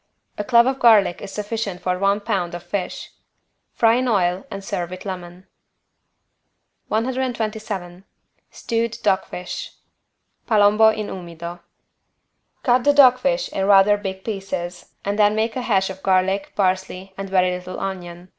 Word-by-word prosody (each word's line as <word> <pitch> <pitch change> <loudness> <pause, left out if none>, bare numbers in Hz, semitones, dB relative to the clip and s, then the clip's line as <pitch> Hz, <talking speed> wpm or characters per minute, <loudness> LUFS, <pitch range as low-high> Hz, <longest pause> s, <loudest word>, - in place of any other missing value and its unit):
A 210 - -3
clove 235 +2 +5
of 265 +1 -1
garlic 210 -7 +5
is 200 - -7
sufficient 210 -2 -4
for 180 0 -2
one 200 +1 +2
pound 195 -5 -2
of 175 - -8
fish. 185 +2 -4 0.6
Fry 230 0 +4
in 255 0 0
oil 185 -4 +1
and 195 - -7
serve 175 -3 -3
with 185 +2 -9
lemon. 180 -1 -7 1.4
127 220 -6 -3 0.5
STEWED 230 -1 -2
DOG 195 -3 +2
FISH 180 0 -7 0.7
(Palombo 215 0 +5
in 215 -1 -2
umido) 170 -2 -8 1.0
Cut 245 0 +3
the 290 - +4
dog 255 -3 +7
fish - - 0
in 195 0 -2
rather 200 +1 +6
big 190 -2 -6
pieces 185 -4 -5 0.2
and 200 +1 -2
then 210 0 +4
make 220 +1 -1
a 255 - -2
hash 195 -5 +1
of 190 0 -11
garlic, 190 +1 +1
parsley 190 0 -1
and 195 0 -6
very 185 -1 +3
little 180 0 -6
onion. 180 -2 -6
195 Hz, 145 wpm, -21 LUFS, 185-220 Hz, 1.4 s, dog